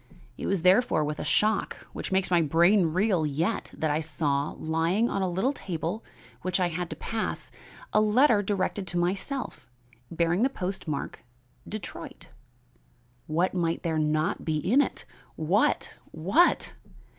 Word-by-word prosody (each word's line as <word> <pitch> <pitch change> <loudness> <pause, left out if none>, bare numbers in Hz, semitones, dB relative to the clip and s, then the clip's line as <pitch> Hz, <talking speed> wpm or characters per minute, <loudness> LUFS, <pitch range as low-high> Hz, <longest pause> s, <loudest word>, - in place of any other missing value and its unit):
It - - -5
was 190 -4 0
therefore 185 -3 +4
with 150 0 -3
a - - -3
shock, 205 +8 +1 0.2
which - - -5
makes 190 -1 +1
my 175 -1 +5
brain 170 +5 +4
reel 185 +1 +1
yet, 155 +9 -1
that 155 -1 0
I 150 - +1
saw, 145 -2 -1
lying 165 +8 +1
on 195 - -1
a 190 - 0
little 195 +11 0
table 180 - -4 0.4
which 185 +1 -1
I 180 -1 +2
had 175 +1 -4
to - - -5
pass, 225 -1 -4 0.4
a - - +5
letter 215 +1 +4
directed 195 -1 -2
to 175 - -3
myself, 190 - -2 0.4
bearing 170 +3 +1
the 260 - +4
postmark, 180 - -4 0.5
Detroit. 215 -1 -8 1.0
What 170 +4 +1
might 170 -2 -1
there 160 -2 0
not 155 +4 0
be 155 -1 0
in 225 - +3
it? - - -3 0.3
What? - - +1 0.2
What? 195 - +2
180 Hz, 150 wpm, -27 LUFS, 160-205 Hz, 1.0 s, my